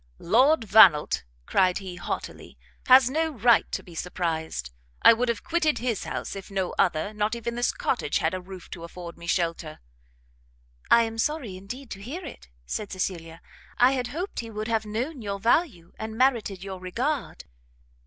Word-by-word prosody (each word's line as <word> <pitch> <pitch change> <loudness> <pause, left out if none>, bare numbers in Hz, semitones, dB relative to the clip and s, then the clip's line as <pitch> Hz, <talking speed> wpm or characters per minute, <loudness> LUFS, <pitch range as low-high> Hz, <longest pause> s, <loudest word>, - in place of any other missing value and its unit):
"Lord 260 - +4
Vannelt," 200 - +6 0.2
cried 185 - +2
he, 190 -2 -7
haughtily, 175 - -6 0.3
"has 255 -1 +8
no 320 +5 0
right 235 -4 +3
to - - -3
be 175 - -14
surprised. 160 - -3 0.3
I - - +10
would 240 +2 -1
have 235 - -2
quitted 320 -3 +1
his 235 -4 -2
house, - - -4
if 195 +1 -8
no 190 -2 -2
other, 180 +1 +1
not 210 +2 -1
even 235 0 -4
this 240 +1 +1
cottage, - - -1
had - - 0
a 185 - -3
roof 185 -1 -11
to 170 - -8
afford 170 0 -9
me 170 - -11
shelter!" 165 -3 -1 1.1
"I 235 - +7
am 225 0 -4
sorry, 275 -7 -1
indeed, 230 +8 -9
to 195 - -7
hear 310 - -6
it," 250 - -11 0.2
said 205 - -4
Cecilia; 170 -3 -4 0.4
"I 250 +2 +6
had 255 -2 -1
hoped 340 +10 -5
he 230 - -5
would 215 0 -5
have 220 -2 0
known 250 +7 -3
your 200 -2 -4
value, 230 - +1
and 220 0 -5
merited 230 -7 +1
your 190 -1 -6
regard." 240 - -3
215 Hz, 175 wpm, -26 LUFS, 185-250 Hz, 1.1 s, I